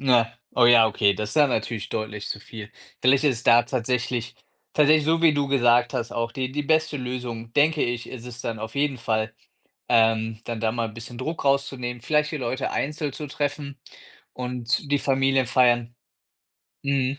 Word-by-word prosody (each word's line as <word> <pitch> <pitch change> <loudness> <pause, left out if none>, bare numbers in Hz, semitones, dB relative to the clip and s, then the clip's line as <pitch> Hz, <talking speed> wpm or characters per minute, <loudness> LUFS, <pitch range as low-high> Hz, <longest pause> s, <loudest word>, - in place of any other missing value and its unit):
Ne, 120 -4 +3 0.2
oh 120 - +4
ja, 120 -2 +7
okay, 105 -2 +2
das 105 +1 -4
ist - - -3
ja 150 -1 +6
natürlich 115 -4 -3
deutlich 105 -1 -4
zu - - -4
viel. 110 0 -10 0.3
Vielleicht 135 +3 +4
ist 135 -5 +2
es 115 - -8
da 120 0 +6
tatsächlich 125 -1 -2 0.4
tatsächlich 150 0 +4
so, 165 +2 +1
wie 160 -2 +5
du 145 -1 0
gesagt 120 -3 +3
hast 115 - -3
auch 115 0 -2
die 130 +2 -4
die 150 +2 -2
beste 155 0 +1
Lösung, 125 -3 -5
denke 150 +3 +3
ich, 120 -1 -2
ist 125 -2 -9
es 120 -1 -8
dann 115 -1 -4
auf 110 +1 -6
jeden 140 -1 0
Fall, 110 -1 -1 0.5
ähm, 110 -1 +2
dann 115 -2 -5
da 110 0 +1
mal 115 -1 -2
'n 105 - -12
bisschen 120 +1 -8
Druck 155 +6 -4
rauszunehmen, 135 -3 -1
vielleicht 150 +2 +1
die - - -2
Leute 130 0 -3
einzeln 150 0 -2
zu 150 - -6
treffen 145 -1 -4 0.5
und 125 +2 -3
die 145 - +4
Familiefeiern 130 -3 +2 0.9
mhm. 140 -1 0
125 Hz, 185 wpm, -24 LUFS, 115-140 Hz, 0.9 s, ja